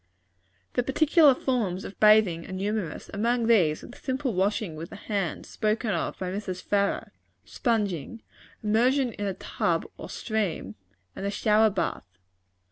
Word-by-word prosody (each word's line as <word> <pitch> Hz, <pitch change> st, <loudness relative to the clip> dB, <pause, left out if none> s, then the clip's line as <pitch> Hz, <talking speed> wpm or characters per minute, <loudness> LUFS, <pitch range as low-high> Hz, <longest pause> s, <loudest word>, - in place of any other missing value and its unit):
The 245 Hz, -, +2 dB
particular 290 Hz, +2 st, +5 dB
forms 215 Hz, -9 st, -1 dB
of 195 Hz, -, -9 dB
bathing 210 Hz, -6 st, +5 dB
are -, -, -7 dB
numerous. 195 Hz, -2 st, -3 dB
Among 235 Hz, +3 st, +1 dB
these, 180 Hz, -10 st, +3 dB
are -, -, -9 dB
the -, -, -13 dB
simple 260 Hz, -2 st, -2 dB
washing 195 Hz, -2 st, 0 dB
with 165 Hz, +2 st, -7 dB
the -, -, -9 dB
hand, 200 Hz, -5 st, -3 dB
spoken 215 Hz, +1 st, -1 dB
of -, -, -2 dB
by 185 Hz, -1 st, -3 dB
Mrs. 190 Hz, -2 st, -4 dB
Farrar; 200 Hz, -1 st, 0 dB, 0.3 s
sponging; 215 Hz, -, -2 dB, 0.4 s
immersion 245 Hz, +4 st, +2 dB
in 205 Hz, 0 st, -3 dB
a 195 Hz, -, -2 dB
tub -, -, -1 dB
or -, -, -7 dB
stream; 205 Hz, -, -2 dB, 0.4 s
and -, -, -6 dB
the 200 Hz, -, 0 dB
shower 215 Hz, +1 st, +3 dB
bath. 95 Hz, -, -3 dB
210 Hz, 150 wpm, -27 LUFS, 185-230 Hz, 0.4 s, particular